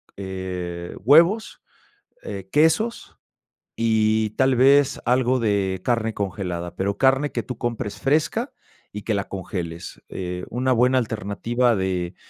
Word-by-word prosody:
eh, 90 -2 -5
huevos, 170 - +4 0.6
eh, 95 -2 -7
quesos 160 - +1 0.6
y 110 -1 +2
tal 130 +3 +2
vez 140 +2 +4
algo 125 +1 +2
de 100 -4 0
carne 115 -2 0
congelada, 90 -3 -4
pero 100 +1 -2
carne 135 +3 +3
que - - -3
tú 125 - -6
compres 115 -3 -4
fresca 160 - +1 0.4
y 105 0 -7
que 110 - -1
la 100 -1 -2
congeles. 90 -3 -6
Eh, 90 -1 -5
una 130 +2 0
buena 125 +2 +3
alternativa 115 +2 0
de 90 -2 -2
110 Hz, 125 wpm, -23 LUFS, 95-130 Hz, 0.6 s, huevos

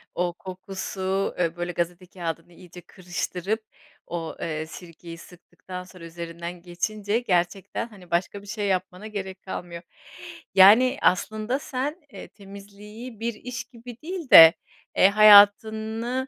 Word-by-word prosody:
O 175 -1 -1
kokusu, 190 +1 -4
eee, 170 -1 0
böyle 175 0 -4
gazete 175 +1 -4
kâğıdını 170 -1 -7
iyice 175 0 -14
kırıştırıp 185 +4 -4 0.4
o, 165 -2 -5
eee, 155 -1 -3
sirkeyi 170 +1 -11
sıktıktan 180 +1 -11
sonra 180 -2 -13
üzerinden 170 +1 -8
geçince 205 +5 -2
gerçekten, 195 +1 -2
hani, 185 -6 -17
başka 185 +3 -1
bir 205 - -16
şey 205 0 -3
yapmana 185 +2 -3
gerek 190 -3 -7
kalmıyor. 175 -2 -7 0.7
Yani, 235 +8 +7
aslında 215 +7 0
sen, 290 +5 -4
eee, - - -9
temizliği 205 +3 -12
bir 235 0 -2
iş 235 +2 -7
gibi 240 -1 -12
değil 340 -2 -6
de, 165 0 +11 0.4
eee, 190 - +6
hayatını 220 +4 +5
190 Hz, 130 wpm, -24 LUFS, 175-215 Hz, 0.7 s, de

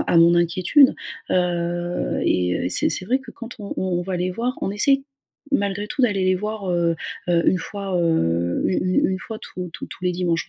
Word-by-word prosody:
à - - +4
mon 170 +1 +6
inquiétude. 180 - +4 0.4
Heu, 175 - -1
et 90 -1 +1
heu, - - -3
et - - 0
c'est - - +3
c'est 185 - +1
vrai 255 +4 +2
que 265 -3 -12
quand 235 +1 -9
on 200 -2 -6
on 180 -2 -1
va 180 0 -3
les 180 +1 -1
voir, 240 +6 -2
on - - -1
essaie, 270 +7 +3 0.5
malgré 200 -5 0
tout 275 +4 -2
d'aller 205 -6 +2
les 185 - +3
voir, 210 0 -4
heu 170 -1 +1 0.3
heu, 170 -1 +3
1 185 - +2
fois, 195 -1 -4
heu, 85 - +1
u - - 0
une 185 0 +2
une 190 - -2
fois 220 +3 -7
tous 180 -1 -7
tous - - -7
tous 185 - -10
les 180 - +2
dimanches, 175 -2 -1
185 Hz, 215 wpm, -22 LUFS, 175-205 Hz, 0.5 s, mon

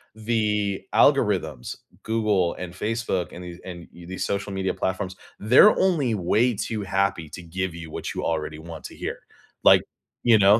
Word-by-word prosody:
the 105 -3 0
algorithms, - - +2 0.3
Google 105 -6 +1
and 90 -1 -7
Facebook 105 -3 -1
and 90 - -8
the 90 0 -8
and, 85 -2 -7
eh, 85 0 -11
these 95 +1 -3
social 100 0 -2
media 95 0 -1
platforms, 95 0 -2 0.2
they're 125 - +7
only 155 -11 +2
way 110 +6 +2
too 110 +1 -3
happy 95 -4 0
to 90 - -8
give 90 +1 -3
you 80 -2 -8
what - - -4
you - - -3
already 75 -1 -2
want 80 0 -9
to - - -8
hear. - - -5 0.4
Like, - - +8 0.4
you 115 -3 +6
know, 100 +3 +6
95 Hz, 170 wpm, -25 LUFS, 85-110 Hz, 0.4 s, Like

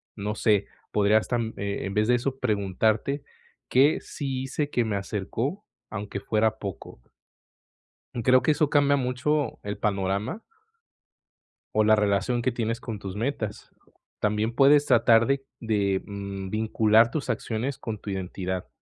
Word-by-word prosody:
no 105 0 -3
sé, 105 -2 +2 0.3
podrías, 105 +1 +3
tam 115 -2 -1
eh, 100 0 -3
en 95 - -4
vez 105 +1 +2
de 125 - +4
eso, 130 +2 -2
preguntarte: 110 +5 0 0.5
"¿Qué 140 +4 +4
sí 135 -3 -4
hice 145 +2 -2
que 120 -2 +1
me 105 - -1
acercó, 110 - -3 0.2
aunque 100 -1 -5
fuera 110 +1 +1
poco? 100 - -7 1.2
Creo 130 +1 +5
que - - +3
eso 150 0 +2
cambia 145 -1 +4
mucho 130 +1 -1
el 100 0 -4
panorama 100 - -1 1.3
o 110 - +3
la 110 0 +5
relación 105 +4 +1
que 130 +2 +1
tienes 115 0 -2
con 110 -4 -6
tus 95 -1 -6
metas. 110 -2 -3 0.5
También 105 +2 0
puedes 145 +2 +6
tratar 115 -2 +5
de 135 0 +1 0.2
de, 100 -4 0
mm, 100 -1 -6
vincular 110 +1 +3
tus 145 -5 -3
acciones 115 +3 -3
con 110 -3 -5
tu 105 - -8
identidad, 95 -1 -4
110 Hz, 145 wpm, -26 LUFS, 100-130 Hz, 1.3 s, puedes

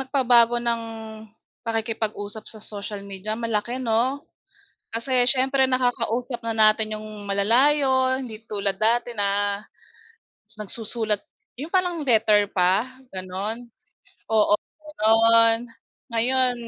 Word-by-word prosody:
nagpabago 245 -3 +3
ng 235 -1 0 0.8
pakikipag-usap 220 -2 -4
sa - - -11
social 205 -1 -7
media, 200 +2 -5
malaki 230 +1 -2
'no, 255 +3 -1 0.7
kasi 245 +2 0
siyempre 265 +2 +3
nakakausap 245 -1 -1
na 230 - -2
natin 215 0 +2
yung 215 -1 -10
malalayo, 260 +6 +2
hindi 225 -4 -9
tulad 200 -3 -2
dati 235 +3 0
na 200 0 -1 0.9
nagsusulat 215 0 -2 0.4
yung 310 +7 -8
parang 355 -5 0
letter 215 -4 +3
pa, 185 +5 +2 0.2
gano'n, 195 +6 -5 0.6
oo, 215 -2 +3 0.5
gano'n. 225 +1 +5 0.5
Ngayon, 250 +2 +4
225 Hz, 100 wpm, -23 LUFS, 210-250 Hz, 0.9 s, gano'n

